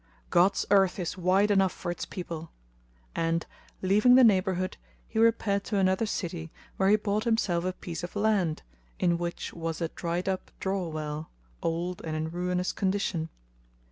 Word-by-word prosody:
God's 180 +3 +4
earth 195 -2 +4
is 175 -3 -3
wide 190 +3 +3
enough 195 -2 +4
for 175 - -4
its 175 - -5
people;" 165 -3 -6 0.6
and, 165 0 0 0.4
leaving 210 +6 +5
the 260 - +8
neighbourhood, 185 -4 +2 0.3
he 220 - -2
repaired 220 -3 +3
to 210 - -1
another 190 +3 +2
city 170 -5 -3 0.3
where 190 0 +3
he 210 - +7
bought 210 +1 -1
himself 195 -7 +1
a 185 - 0
piece 175 -2 -6
of 175 - -6
land 205 -7 +1 0.3
in 170 -1 +2
which 175 0 -4
was 165 -1 -4
a 165 -2 -1
dried 170 +2 -3
up 190 -1 -2
draw 190 -2 -1
well,[FN#218] 155 -1 -4 0.3
old 170 +2 -2
and 160 -1 -3
in 160 +1 -2
ruinous 180 +1 -1
condition. 185 -4 -1
185 Hz, 165 wpm, -28 LUFS, 170-200 Hz, 0.6 s, the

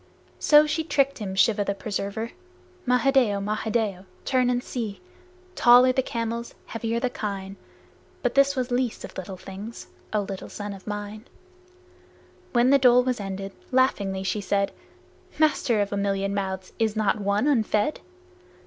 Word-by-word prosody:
So 300 0 +6
she 315 +2 -1
tricked 280 -3 +1
him, 195 -3 -4
Shiva 205 +2 +3
the 200 0 -2
Preserver. 200 +2 -4 0.6
Mahadeo! 250 -4 +3
Mahadeo! 210 -1 -1 0.2
Turn 255 -2 +2
and 245 0 0
see. 225 -7 -4 0.5
Tall 245 -3 +7
are 255 - +4
the 260 - +2
camels, 235 -1 -4
heavy 230 0 -3
are - - +1
the 250 0 -1
kine, 195 -3 -5 0.7
But 245 - +1
this 275 +1 +4
was 255 -1 -2
Least 245 -1 -1
of - - -12
Little 190 0 -6
Things, 195 +5 -9 0.2
O 210 - +1
little 195 -1 -6
son 205 -1 -6
of 195 +1 -13
mine! 210 +1 -5 1.3
When 245 +1 +4
the 280 - +6
dole 250 -1 +6
was 250 -2 -1
ended, 195 0 -5 0.2
laughingly 200 -7 +1
she 195 +2 -1
said, 200 0 0 0.7
"Master, 290 -7 +2
of 205 0 -2
a - - -1
million 195 0 0
mouths, 190 -2 -3
is 220 -1 +1
not 215 -1 +1
one 200 +4 +1
unfed?" 225 -2 +1
215 Hz, 160 wpm, -25 LUFS, 200-250 Hz, 1.3 s, Tall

